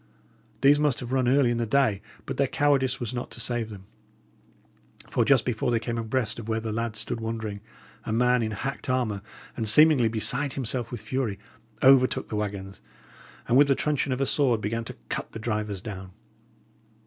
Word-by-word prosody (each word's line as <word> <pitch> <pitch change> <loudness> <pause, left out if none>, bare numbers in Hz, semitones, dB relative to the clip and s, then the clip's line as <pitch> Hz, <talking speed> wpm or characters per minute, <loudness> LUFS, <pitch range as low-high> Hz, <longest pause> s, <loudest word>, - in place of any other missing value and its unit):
These 145 +2 +6
must 150 -4 +1
have 125 0 -7
run 130 -2 +1
early 130 -1 +4
in 120 - -1
the 115 - -1
day; 110 -6 +2 0.2
but - - -5
their 140 - +2
cowardice 135 -2 +1
was 120 -1 -4
not 120 0 -4
to - - -9
save 120 -2 -1
them. 100 -3 -10 1.2
For - - +1
just 135 -4 +3
before 120 -1 -1
they 120 -1 +2
came 115 0 -3
abreast 115 0 -2
of 115 -1 -8
where 110 0 0
the 110 -1 -4
lads 115 0 -3
stood 115 - -3
wondering, 110 -2 -4 0.4
a - - -4
man 125 +2 +3
in 110 - -1
hacked 130 +6 -5
armour, 120 -6 0 0.3
and 110 -3 +1
seemingly 150 -1 +6
beside 125 +5 0
himself 120 -2 -3
with 120 -4 -6
fury, 110 -2 -2 0.5
overtook 130 -1 +5
the - - -3
waggons, 100 -2 -4 0.7
and 120 - +4
with 145 +1 +6
the 135 - +3
truncheon 145 -1 0
of 130 - -1
a - - +3
sword, 130 -5 +2
began 115 +2 -2
to - - -8
cut - - -4
the - - -5
drivers 105 -3 -3
down. 95 -3 -7
120 Hz, 195 wpm, -26 LUFS, 110-130 Hz, 1.2 s, These